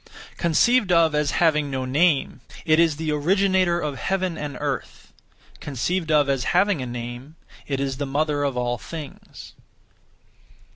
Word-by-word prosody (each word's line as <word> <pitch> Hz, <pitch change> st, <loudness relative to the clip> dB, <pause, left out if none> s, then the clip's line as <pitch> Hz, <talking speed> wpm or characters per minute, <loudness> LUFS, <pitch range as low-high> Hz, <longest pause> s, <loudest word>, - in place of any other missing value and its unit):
(Conceived 195 Hz, +6 st, +2 dB
of 165 Hz, -2 st, +4 dB
as) 150 Hz, -1 st, +1 dB
having 150 Hz, -4 st, +2 dB
no 130 Hz, -1 st, -3 dB
name, 140 Hz, -1 st, +1 dB, 0.2 s
it 155 Hz, -1 st, +4 dB
is 165 Hz, -3 st, +3 dB
the 155 Hz, 0 st, -3 dB
Originator 185 Hz, +3 st, +2 dB
of 145 Hz, -5 st, -4 dB
heaven 185 Hz, -3 st, -1 dB
and 145 Hz, -4 st, -6 dB
earth; -, -, -5 dB, 0.5 s
(conceived 160 Hz, +5 st, -2 dB
of 150 Hz, -2 st, +4 dB
as) 135 Hz, -3 st, 0 dB
having 195 Hz, -5 st, +2 dB
a 125 Hz, -, -4 dB
name, 120 Hz, +5 st, -7 dB, 0.3 s
it 135 Hz, -2 st, -2 dB
is 135 Hz, -1 st, -2 dB
the 145 Hz, 0 st, -3 dB
Mother 145 Hz, +1 st, 0 dB
of 140 Hz, -3 st, -1 dB
all 120 Hz, 0 st, -1 dB
things. 155 Hz, -4 st, -10 dB
150 Hz, 150 wpm, -23 LUFS, 135-170 Hz, 0.5 s, of